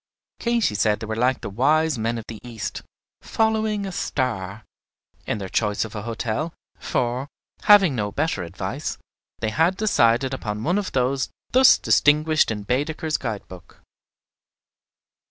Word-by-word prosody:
Katy 235 - +1
said 105 +1 +1
they - - -5
were 110 0 -3
like 125 +3 +1
the - - -5
Wise 150 +5 +2
Men 115 +2 -1
of 115 - -7
the 110 -2 -8
East, 115 -3 -6 0.4
"following 220 -2 0
a 195 - -4
star," 110 - -3 0.6
in - - -1
their 100 -2 -5
choice 105 +2 0
of 110 - -10
a 105 - -4
hotel; 115 +8 -3 0.2
for, 125 +3 -1 0.4
having 195 -7 +7
no 105 -3 -2
better 120 - -1
advice, 95 - -4 0.4
they 110 -1 -1
had 165 +9 +2
decided 130 - +2
upon 105 -4 -4
one 180 +6 +1
of 200 - -5
those 130 +1 0 0.2
thus 260 0 +7
distinguished 155 +1 +3
in 105 -2 -3
Baedeker's 150 +7 -1
Guide 110 -5 -5
book. 90 -2 -14
125 Hz, 150 wpm, -23 LUFS, 110-160 Hz, 0.6 s, having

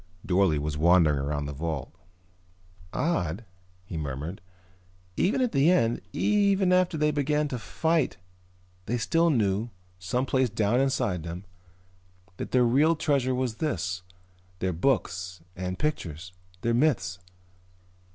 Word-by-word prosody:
Dorle 90 -4 +3
was 75 0 -3
wandering 80 -3 +4
around 75 +1 -2
the 70 - -5
vault. 80 -1 -4 1.0
"Odd," 100 - -1 0.4
he 90 - -6
murmured. 75 +5 -5 0.7
"Even 205 +8 +1
at 250 -2 +1
the 140 +4 +4
end, 120 -11 +2
even 200 -3 +2
after 180 -2 +2
they 150 - +2
had - - -1
begun 150 +1 +1
to 125 - -3
fight 160 +2 0 0.7
they 120 - 0
still 165 +8 +2
knew, 110 -4 +1 0.3
someplace 125 +6 0
down 110 +4 +1
inside 105 -10 0
them, 85 +4 -7 0.9
that - - -5
their 125 -1 +3
real 145 +8 +4
treasure 140 -5 +1
was 125 -3 -2
this, 90 - -2 0.6
their 95 0 -1
books 90 -3 -1
and 90 0 -4
pictures, 90 - -3 0.3
their 115 - +1
myths. 115 - +1
115 Hz, 130 wpm, -27 LUFS, -, 1.0 s, wandering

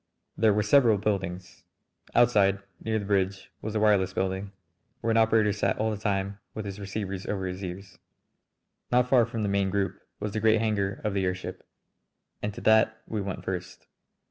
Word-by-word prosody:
There 110 0 +4
were 105 +1 +2
several 115 0 +5
buildings. 95 -3 -3 0.5
Outside 105 -5 +5 0.3
near 110 0 0
the 100 - -3
bridge 100 -1 0
was 110 - -4
the 110 - 0
wireless 100 -3 +3
building, 95 +1 -2 0.5
where 115 - 0
an 115 - +3
operator 110 -2 +4
sat 100 -2 0
all 110 +1 0
the 105 - -3
time 100 -1 -2 0.2
with 110 - -4
his 100 0 -6
receivers 100 -1 -4
over 95 -2 -2
his 90 +1 -5
ears. 95 +1 -7 0.9
Not 125 0 +4
far 125 -3 +4
from 115 -2 -3
the - - 0
main 100 -1 +1
group 100 0 -1 0.2
was 105 - -3
the 110 - -2
great 110 +1 +4
hangar 100 -3 -1
of 105 - -1
the 95 -1 0
airship, 90 0 -4 0.8
and 105 - -2
to - - -7
that 110 0 +3
we 110 -2 -3
went 100 -1 -5
first. 90 -2 -5
100 Hz, 185 wpm, -27 LUFS, 95-110 Hz, 0.9 s, several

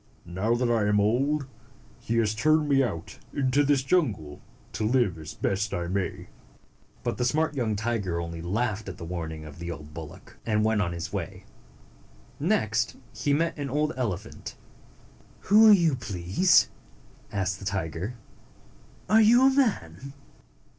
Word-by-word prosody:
Now 95 +7 0
that 120 0 +1
I 110 -3 +2
am 105 0 +3
old, 135 +8 +1 0.5
he 115 - -2
has 110 -2 +2
turned 155 +6 +2
me 140 -1 +4
out 105 -11 -4 0.2
into 140 +1 +2
this 140 -2 +2
wild - - -19
jungle 105 - 0 0.3
to 110 - -3
live 110 -7 +1
as 80 -1 -8
best 100 +1 -1
I 85 -2 -2
may." 95 +2 -3 0.8
But - - -2
the - - 0
smart 150 +5 +1
young 115 -5 0
tiger 100 -5 -2
only 85 -1 -5
laughed 105 +3 -2
at 95 - -8
the 85 - -7
warning 80 -2 -5
of 75 +1 -11
the 85 0 -5
old 75 -2 -8
bullock, 80 -1 -11
and 105 -1 +1
went 110 -1 +2
on 85 -4 -1
his 85 -1 -6
way. - - -5 0.9
Next 115 - 0 0.2
he 125 +6 -1
met 165 +4 +1
an 140 -1 -3
old 150 +3 0
elephant. 110 -6 -4 0.9
"Who 215 +2 +6
are - - +9
you, 170 -8 +5
please?" 100 - +2 0.6
asked 95 -1 -2
the 95 - -9
tiger. 95 +3 -3 0.9
"Are 220 +1 +5
you 235 +4 +6
a - - +7
man?" 140 - -1
110 Hz, 160 wpm, -27 LUFS, 90-140 Hz, 0.9 s, are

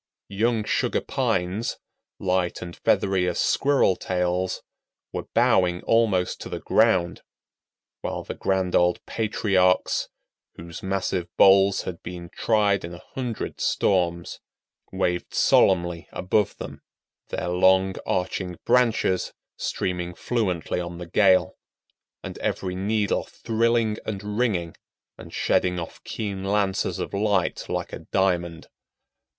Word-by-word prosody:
Young 110 +2 +1
Sugar - - 0
Pines, 95 +6 -1 0.4
light 90 -1 0
and 85 -1 -8
feathery 95 -2 +1
as 90 - -1
squirrel 135 -9 +3
tails, 90 0 -1 0.5
were - - -4
bowing 90 -1 +3
almost 110 -6 +2
to - - -6
the - - -4
ground; 95 -6 +2 0.8
while - - -4
the - - -5
grand 95 -2 0
old 90 0 +2
patriarchs, 100 -4 +1 0.5
whose 85 +2 -9
massive 95 -3 -1
boles 95 0 +6
had 85 -2 -6
been 85 -1 -8
tried 105 -3 +2
in 85 +1 -6
a 85 - -13
hundred 125 -4 -4
storms, 85 -3 0 0.5
waved 90 -2 -2
solemnly 85 -2 +3
above 95 +3 0
them, - - -8 0.5
their - - -3
long, 95 +1 +4
arching 90 -1 -2
branches 115 -6 +2 0.2
streaming 90 -1 -3
fluently 95 -9 -1
on 85 -1 -5
the 90 - -6
gale, 95 +1 +3 0.7
and - - -7
every 95 -1 -2
needle 105 +2 0
thrilling 115 -1 0
and 105 -2 -5 0.2
ringing 90 -9 0 0.4
and - - -11
shedding 90 -1 +1
off 85 - -8
keen 100 -3 -4
lances 100 -1 0
of - - -5
light 100 0 0
like - - -3
a - - -5
diamond. 85 -4 -1
95 Hz, 120 wpm, -25 LUFS, 90-105 Hz, 0.8 s, boles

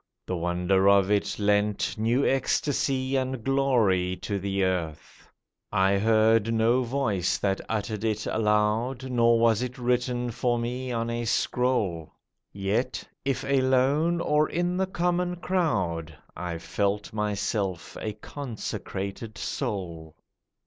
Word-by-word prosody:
The 90 - -2
wonder 90 +3 +2
of 100 0 +4
it 105 -1 +1
lent 105 0 +1
New 115 +5 +1
ecstasy 135 0 0
and 130 -2 -1
glory 115 -10 +2
to 100 -2 -2
the 100 0 -1
earth. 90 -5 -3 0.4
I 100 -1 +3
heard 110 +1 +3
no 115 +3 +3
voice 115 -8 0
that 95 -1 -1
uttered 110 -1 -2
it 110 -1 -1
aloud, 110 +4 0
Nor 115 -1 +4
was 115 -1 +3
it 125 +1 -4
written 125 0 0
for 120 +1 0
me 125 +2 -3
on 115 0 -1
a 120 0 -2
scroll; 110 -10 0 0.4
Yet, 100 +5 -1 0.2
if 135 -1 -1
alone 135 +5 +2
or 150 -1 +2
in 175 +1 -1
the 190 +1 0
common 180 0 0
crowd, 95 - -1 0.2
I 90 -2 -4
felt 100 +5 -2
myself 105 -3 -2
a 110 - -3
consecrated 110 -3 -6
soul. 85 -5 -4
110 Hz, 125 wpm, -27 LUFS, 100-130 Hz, 0.4 s, of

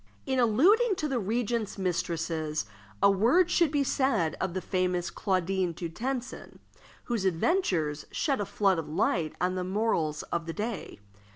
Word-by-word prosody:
In 265 -1 0
alluding 375 - +4
to 305 - -2
the 265 -4 -1
regent's 225 +1 -1
mistresses, 165 - -2 0.4
a 200 - +7
word 255 - +3
should 340 -3 +4
be 285 -1 +1
said 260 - +1
of 180 - -2
the - - 0
famous 180 -1 -1
Claudine 185 -1 0
du 170 +1 -5
Tencin, 250 +7 -5 0.5
whose 235 -5 -2
adventures 175 - 0
shed 275 -7 0
a - - -1
flood 195 -3 +2
of 155 -2 -6
light 155 0 0
on 180 +1 +1
the 185 -1 -2
morals 180 -6 0
of 170 -1 -1
the 165 - -3
day. 215 - -5
195 Hz, 160 wpm, -28 LUFS, 170-250 Hz, 0.5 s, a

